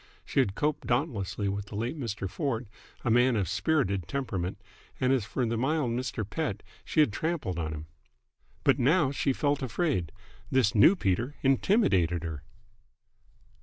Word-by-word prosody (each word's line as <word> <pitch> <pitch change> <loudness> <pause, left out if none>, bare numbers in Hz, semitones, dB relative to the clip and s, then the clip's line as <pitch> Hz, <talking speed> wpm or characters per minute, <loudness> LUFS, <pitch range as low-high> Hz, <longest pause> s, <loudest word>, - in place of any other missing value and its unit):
She - - 0
had 105 -7 +2
coped 150 0 -1
dauntlessly 115 - -1
with 100 +1 -3
the 100 - -9
late 115 +7 -2
Mr. 110 -8 -4
Ford, 125 - -2 0.4
a 120 - +2
man 120 +1 +4
of 105 - +2
a - - -7
spirited 100 - 0
temperament; 100 -7 -3 0.4
and 130 0 +3
as 125 -6 +1
for 125 +3 -1
the 115 0 -1
mild 135 -1 +1
Mr. 120 -3 -3
Pett 110 -4 -3 0.2
she 155 - +2
had 125 -9 +3
trampled 140 - -2
on 80 -1 -2
him. 75 0 -6 0.8
But - - +4
now 150 +2 +3
she 140 0 0
felt 145 +1 0
afraid. 130 - -1 0.4
This 130 -6 +3
new 115 - +7
Peter 120 - -1
intimidated 105 - +3
her. 80 -4 -5
120 Hz, 165 wpm, -29 LUFS, 100-140 Hz, 0.8 s, new